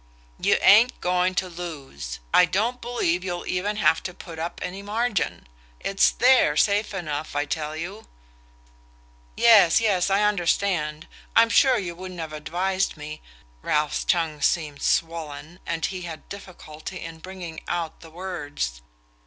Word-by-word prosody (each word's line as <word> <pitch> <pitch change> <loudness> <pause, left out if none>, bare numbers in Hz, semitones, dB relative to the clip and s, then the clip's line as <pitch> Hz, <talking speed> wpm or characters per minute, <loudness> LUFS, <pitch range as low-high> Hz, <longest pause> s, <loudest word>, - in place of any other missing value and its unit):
"You - - +3
ain't 225 +6 +6
going 180 +1 +1
to 185 - 0
lose: 145 - -7 0.2
I 180 - +7
don't 220 +8 -1
believe 185 -8 0
you'll 175 -2 -4
even 200 +3 -1
have 210 -6 +3
to 180 - -6
put 165 -3 -10
up 170 +2 -4
any 190 +2 -5
margin. 215 +1 -1 0.3
It's 195 0 +3
THERE 245 - +4
safe 205 +5 +2
enough, 155 -6 -4
I 145 0 +1
tell 155 +1 -3
you..." 190 +7 -7 1.3
"Yes, 210 -8 +7
yes; 200 -5 +2
I 195 +2 +3
understand. 175 -5 0 0.3
I'm 230 0 +6
sure 260 +1 +5
you 180 -5 -3
wouldn't 185 0 -8
have 160 -2 -5
advised 185 +5 -1
me 155 +1 -8 0.2
" - - -31
Ralph's 150 - 0
tongue 160 -4 0
seemed 150 -3 0
swollen, 165 0 -2
and 165 -1 -1
he 185 -2 -4
had 170 -3 -8
difficulty 185 -3 -9
in 165 -1 -8
bringing 175 -2 -8
out 170 -2 -3
the 165 - -13
words. 145 - -5
175 Hz, 150 wpm, -25 LUFS, 155-195 Hz, 1.3 s, I